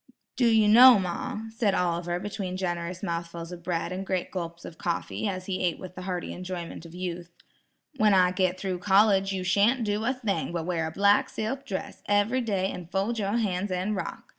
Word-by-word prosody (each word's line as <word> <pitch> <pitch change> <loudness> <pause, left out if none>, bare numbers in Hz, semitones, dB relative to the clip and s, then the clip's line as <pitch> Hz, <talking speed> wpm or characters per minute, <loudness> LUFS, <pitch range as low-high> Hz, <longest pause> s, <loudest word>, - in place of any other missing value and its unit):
"Do 245 -2 +3
you 220 -2 +4
know, 245 +3 +9
ma," 185 +3 -3
said 210 -4 +1
Oliver 175 0 -1
between 195 -2 -4
generous 175 0 -3
mouthfuls 170 -1 -4
of 175 -1 -8
bread 170 0 -2
and 185 +1 -3
great 185 -2 -2
gulps 170 -2 -5
of 165 - -10
coffee, 175 +5 -2
as 185 -2 -4
he 185 -1 -3
ate 175 -2 +1
with 185 -1 -9
the 185 - -8
hearty 180 -1 -4
enjoyment 180 -2 -6
of 165 - -13
youth, 180 -1 -5 0.7
"when 215 -4 +4
I 180 -1 +5
get 185 -1 0
through 185 -2 -3
college, 195 0 +4
you 190 -1 -2
shan't 205 +7 +3
do 210 0 -1
a 240 - +2
thing 210 -8 -2
but 165 -2 -2
wear 170 -3 -1
a - - -5
black 200 +4 +3
silk 265 +6 -4
dress 190 - -5
every 205 +5 +2
day 195 -5 -1
and 175 -2 -8
fold 200 +5 -1
your 205 +2 0
hands 200 -3 -1
and 185 +3 -1
rock. 190 - -5
185 Hz, 205 wpm, -27 LUFS, 175-205 Hz, 0.7 s, know